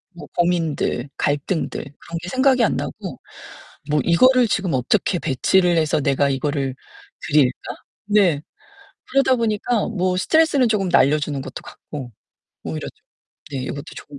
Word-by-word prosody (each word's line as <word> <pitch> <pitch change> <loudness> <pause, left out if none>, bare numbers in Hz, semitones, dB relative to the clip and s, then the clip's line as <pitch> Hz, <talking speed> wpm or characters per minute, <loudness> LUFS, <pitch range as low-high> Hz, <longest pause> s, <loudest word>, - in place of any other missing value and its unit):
뭐 175 - -10
고민들, 165 -6 0
갈등들 145 +4 -1 0.2
그런 170 - -7
게 175 - -7
생각이 260 -2 +3
안 - - +2
나고 - - -6 0.7
뭐 150 0 +2
'이거를 255 +8 +5
지금 195 -6 -1
어떻게 175 - +1
배치를 175 +6 +2
해서 155 -1 +2
내가 140 0 +2
이거를 135 -1 -1 0.5
드릴까?' 140 -4 +1 0.3
네. 190 -8 +3 0.7
그러다 270 -1 +4
보니까 225 0 0
뭐 185 -4 -1
스트레스는 290 +1 +3
쪼금 200 -4 0
날려 145 -1 +4
주는 145 -2 -3
것도 130 - -8
같고 135 -5 -9 0.5
오히려 80 -1 -4
좀 - - -18 0.5
네 135 - -2
이것도 140 +2 -5
좋은 145 -1 -10
170 Hz, 300 characters per minute, -21 LUFS, 140-210 Hz, 0.7 s, 이거를